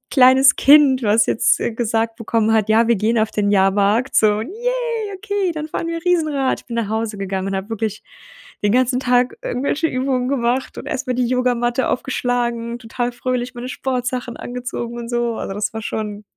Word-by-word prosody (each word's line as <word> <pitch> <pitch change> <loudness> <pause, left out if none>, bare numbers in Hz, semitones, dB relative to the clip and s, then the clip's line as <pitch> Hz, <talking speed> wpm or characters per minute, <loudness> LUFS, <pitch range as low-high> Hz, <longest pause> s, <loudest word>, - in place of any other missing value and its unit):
kleines 260 0 +6
Kind, 275 -2 +6
was 215 0 +3
jetzt, - - +2
äh, 235 - -1
gesagt 225 0 -1
bekommen 225 -1 0
hat: 220 -2 +2
„Ja, 225 +1 +4
wir 235 - +4
gehen 220 +3 +1
auf 220 0 +1
den 205 -1 0
Jahrmarkt“ 200 +5 +2
so, 210 -1 +5
und 220 +3 -4
„Yay, 470 -1 -2
okay, 405 -2 -2
dann 310 -1 -5
fahren 335 - -3
wir 335 0 -4
Riesenrad.“ 310 -7 +1
Ich - - -26
bin 235 - -5
nach 230 -3 -1
Hause 220 -1 -2
gegangen 190 0 -3
und 195 - -2
habe 190 +3 -5
wirklich 220 -1 -3 0.6
den 205 - +3
ganzen 255 0 +2
Tag 250 -1 +1
irgendwelche 280 +6 -1
Übungen 255 -1 -1
gemacht 255 -1 -1
und - - -8
erstmal 270 -3 -2
die 250 - +1
Yogamatte 245 0 0
aufgeschlagen, 240 -2 -2
total 240 +1 -3
fröhlich 250 0 -3
meine 245 +1 -6
Sportsachen 250 -2 -3
angezogen 245 -1 -5
und 235 0 -6
so. 240 -1 -1
Also, 195 - -5
das 205 +2 -2
war 220 - -4
schon 210 -1 -4
245 Hz, 190 wpm, -19 LUFS, 225-260 Hz, 0.6 s, kleines